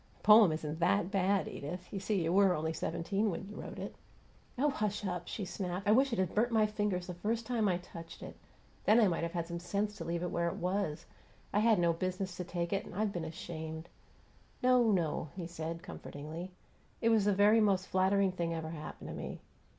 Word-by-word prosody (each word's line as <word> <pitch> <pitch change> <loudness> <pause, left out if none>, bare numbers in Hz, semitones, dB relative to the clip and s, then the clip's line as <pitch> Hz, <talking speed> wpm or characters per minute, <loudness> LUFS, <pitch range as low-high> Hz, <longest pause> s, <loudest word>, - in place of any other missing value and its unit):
"The - - -28
poem 210 -4 +8
isn't 155 0 -3
THAT 180 +2 +2
bad, 195 0 +2
Edith. 175 +6 -6
You 195 - -2
see, 195 -2 0
you 165 +1 +1
were 195 -2 +5
only 160 +1 -1
seventeen 170 +7 -1
when 195 +1 -4
you 210 - -9
wrote - - -7
it." - - -5 0.6
"Oh, 290 +3 +3
hush 210 -3 -2
up!" 180 -2 -3
she 205 - -4
snapped. 185 +1 -4
"I - - +6
wish 265 +4 +4
it 230 - -1
had 185 -2 0
burnt 235 +3 +2
my 220 -2 +4
fingers 205 -4 -1
the 180 - -5
first 225 +6 -2
time 230 -3 +1
I 180 -2 +2
touched 170 -2 -10
it. - - -8 0.5
Then 220 +3 +6
I 220 - +6
might 170 -3 0
have 170 0 -3
had 170 -2 -1
sense 170 +2 -6
enough 205 +1 +1
to 165 - -5
leave 170 +1 -2
it 180 - -2
where 170 0 0
it 170 - -2
was. 180 -4 -2 0.5
I 205 - +3
had 220 0 +5
no 170 -1 +3
business 185 +2 -3
to 180 - -3
take 175 0 -3
it, 195 - 0
and - - -10
I've 210 0 0
been 170 -2 -3
ashamed 160 0 -6 0.4
" - - -31
"No, 250 -2 +5
no," 165 -4 0
he 180 -3 -4
said, 165 0 -5
comfortingly. 155 +5 -7 0.5
"It 230 - +2
was 220 -3 +4
the 205 - +4
very 210 +3 +6
most 195 -3 +3
flattering 190 +1 +2
thing 170 -2 -2
ever 160 -1 -4
happened 155 -2 -7
to - - -5
me. - - -6
185 Hz, 225 wpm, -33 LUFS, 170-210 Hz, 0.6 s, poem